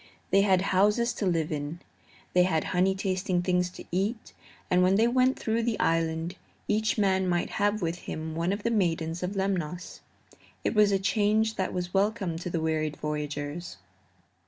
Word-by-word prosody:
They 195 Hz, +1 st, +5 dB
had 190 Hz, -2 st, +3 dB
houses 210 Hz, +5 st, +3 dB
to 200 Hz, -, -2 dB
live 165 Hz, -3 st, 0 dB
in; 150 Hz, +2 st, -4 dB, 0.5 s
they 180 Hz, -, +5 dB
had 180 Hz, -3 st, +2 dB
honey 185 Hz, +1 st, +3 dB
tasting 185 Hz, -2 st, -1 dB
things 180 Hz, 0 st, +1 dB
to 180 Hz, -, -11 dB
eat, 200 Hz, +6 st, -2 dB, 0.3 s
and 180 Hz, 0 st, +3 dB
when 185 Hz, +1 st, +4 dB
they 225 Hz, +3 st, +4 dB
went 255 Hz, +2 st, +3 dB
through 225 Hz, +1 st, 0 dB
the 230 Hz, -2 st, -1 dB
island 165 Hz, +2 st, 0 dB, 0.3 s
each 215 Hz, +2 st, +1 dB
man 190 Hz, -2 st, +2 dB
might 175 Hz, -1 st, 0 dB
have 205 Hz, -1 st, +1 dB
with 165 Hz, +1 st, -1 dB
him 160 Hz, -1 st, -5 dB
one 165 Hz, +3 st, 0 dB
of 205 Hz, +1 st, -3 dB
the 235 Hz, -, +1 dB
maidens 165 Hz, -5 st, 0 dB
of 185 Hz, +3 st, -3 dB
Lemnos. 180 Hz, -3 st, -2 dB, 0.6 s
It -, -, 0 dB
was 210 Hz, -2 st, +5 dB
a 195 Hz, -, +3 dB
change 215 Hz, +2 st, +2 dB
that 190 Hz, -, -1 dB
was 180 Hz, -1 st, -4 dB
welcome 200 Hz, -3 st, +1 dB
to 180 Hz, -, -5 dB
the 170 Hz, -, -1 dB
wearied 155 Hz, -1 st, -1 dB
voyagers. 150 Hz, -, -4 dB
185 Hz, 180 wpm, -28 LUFS, 165-205 Hz, 0.6 s, They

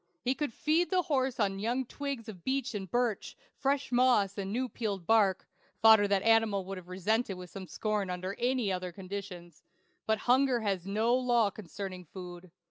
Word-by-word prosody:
He 255 Hz, -, +2 dB
could 295 Hz, -1 st, -3 dB
feed 315 Hz, +8 st, +1 dB
the 370 Hz, -2 st, +2 dB
horse 265 Hz, -5 st, 0 dB
on 195 Hz, -2 st, +1 dB
young 240 Hz, +5 st, -1 dB
twigs 275 Hz, -3 st, -5 dB
of 185 Hz, -6 st, -9 dB
beech 270 Hz, -1 st, -1 dB
and 195 Hz, -3 st, -5 dB
birch; 240 Hz, 0 st, -1 dB, 0.2 s
fresh 275 Hz, 0 st, 0 dB
moss, 240 Hz, -6 st, +3 dB
and 195 Hz, -1 st, -4 dB
new 255 Hz, +4 st, -1 dB
peeled 205 Hz, -7 st, -4 dB
bark 205 Hz, -3 st, +3 dB, 0.3 s
(fodder 220 Hz, -2 st, +7 dB
the 200 Hz, 0 st, +1 dB
animal 225 Hz, -4 st, +3 dB
would 195 Hz, 0 st, -5 dB
have 175 Hz, -, -16 dB
resented 195 Hz, +2 st, 0 dB
with 180 Hz, +1 st, -11 dB
scorn 210 Hz, -1 st, -1 dB
under 185 Hz, +2 st, -4 dB
any 245 Hz, -4 st, +1 dB
other 180 Hz, -1 st, -3 dB
conditions); 185 Hz, -3 st, -8 dB, 0.5 s
but 220 Hz, 0 st, +2 dB
hunger 255 Hz, -1 st, +3 dB
has 195 Hz, -4 st, -2 dB
no 220 Hz, +4 st, +1 dB
law 240 Hz, -4 st, +2 dB
concerning 190 Hz, -1 st, -7 dB
food. 180 Hz, +1 st, -10 dB
215 Hz, 175 wpm, -31 LUFS, 190-245 Hz, 0.5 s, fodder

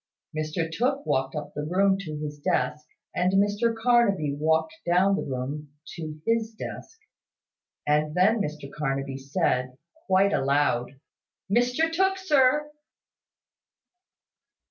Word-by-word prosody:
Mr 155 Hz, +2 st, -2 dB
Tooke 255 Hz, -, -1 dB
walked 135 Hz, +2 st, 0 dB
up 150 Hz, -1 st, -5 dB
the 150 Hz, -, -4 dB
room 190 Hz, +5 st, +2 dB
to 155 Hz, -6 st, -5 dB
his 150 Hz, -1 st, -6 dB
desk, 150 Hz, +1 st, -1 dB, 0.3 s
and 180 Hz, +1 st, +1 dB
Mr 205 Hz, +4 st, +2 dB
Carnaby 225 Hz, -11 st, +2 dB
walked 160 Hz, +1 st, +1 dB
down 180 Hz, +3 st, +3 dB
the -, -, -2 dB
room 140 Hz, +3 st, -5 dB, 0.2 s
to 155 Hz, -2 st, -6 dB
his 225 Hz, -1 st, 0 dB
desk; 450 Hz, -, -8 dB, 0.9 s
and 150 Hz, +1 st, +1 dB
then 205 Hz, +5 st, +4 dB
Mr 150 Hz, -5 st, -4 dB
Carnaby 135 Hz, -2 st, -2 dB
said, 130 Hz, -3 st, -1 dB, 0.3 s
quite 195 Hz, +1 st, +4 dB
aloud, 135 Hz, -2 st, +1 dB, 0.5 s
"Mr 250 Hz, +8 st, +2 dB
Tooke, 385 Hz, +2 st, +2 dB
sir." 300 Hz, -4 st, +3 dB
165 Hz, 120 wpm, -26 LUFS, 150-225 Hz, 0.9 s, then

